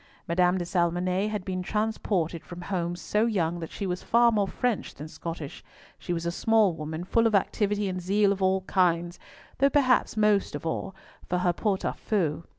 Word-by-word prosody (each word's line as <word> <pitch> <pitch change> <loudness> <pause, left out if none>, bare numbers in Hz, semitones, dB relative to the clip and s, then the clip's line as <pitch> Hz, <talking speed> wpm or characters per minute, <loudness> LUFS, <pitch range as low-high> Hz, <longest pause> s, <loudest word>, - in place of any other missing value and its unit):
Madame 180 +2 +2
de 175 - -2
Salmonnet 180 +3 0
had 210 -3 -4
been 185 -1 -2
transported 195 -5 -1
from 175 - -9
home 175 -2 -2
so 210 +5 0
young 175 -6 0
that 165 - -6
she 200 - -5
was 180 -1 -2
far 235 0 +4
more 205 -3 +1
French 245 +1 -2
than 150 +3 -8
Scottish; 160 -2 -7 0.4
she - - -5
was 170 -1 -2
a 170 - 0
small 215 0 +3
woman 160 +1 -5
full 230 +5 +2
of 220 - +1
activity 205 +1 +1
and 185 -1 -3
zeal 200 +3 +2
of 195 -1 -2
all 190 0 +2
kinds, 175 -2 +1 0.4
though 275 +1 +5
perhaps 260 -6 +2
most 210 -6 +2
of 145 - -6
all 175 +3 -3 0.3
for 180 - +1
her 180 -1 +1
pot 195 +1 -1
au - - +1
feu. 170 -7 -1
185 Hz, 195 wpm, -27 LUFS, 170-210 Hz, 0.4 s, though